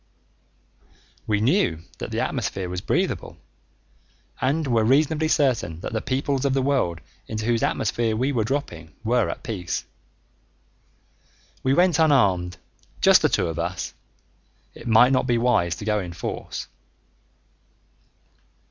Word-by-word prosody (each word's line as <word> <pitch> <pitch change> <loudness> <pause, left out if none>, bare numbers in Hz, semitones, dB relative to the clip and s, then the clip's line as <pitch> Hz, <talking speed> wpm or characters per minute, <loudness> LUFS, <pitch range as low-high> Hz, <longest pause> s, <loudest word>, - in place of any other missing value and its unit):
We 105 -1 +1
knew 110 - +1 0.2
that - - -5
the - - -2
atmosphere 95 -2 -2
was 90 0 -4
breathable - - -1 1.0
and 145 +5 +1
were 115 -4 +2
reasonably 150 +6 +2
certain 125 - +1
that - - -5
the 110 - -1
peoples 135 0 -1
of 135 -1 +1
the 135 - +2
world 125 - 0 0.3
into 110 -1 -4
whose 115 -1 +1
atmosphere 110 +1 0
we 130 +5 0
were 120 -5 +1
dropping 95 - -4
were 120 0 +2
at - - -6
peace. 95 -8 -4 1.8
We 130 +1 +2
went 175 -2 +3
unarmed, 100 - +3 0.4
just - - +6
the - - +3
two - - +1
of 80 0 -4
us; 85 +2 -3 0.8
it - - -11
might 120 +3 +6
not 130 0 +1
be 120 -2 +2
wise 110 -8 +2
to 105 - -8
go 105 -1 +1
in 90 -3 -6
force. 85 - -5
115 Hz, 140 wpm, -24 LUFS, 95-135 Hz, 1.8 s, just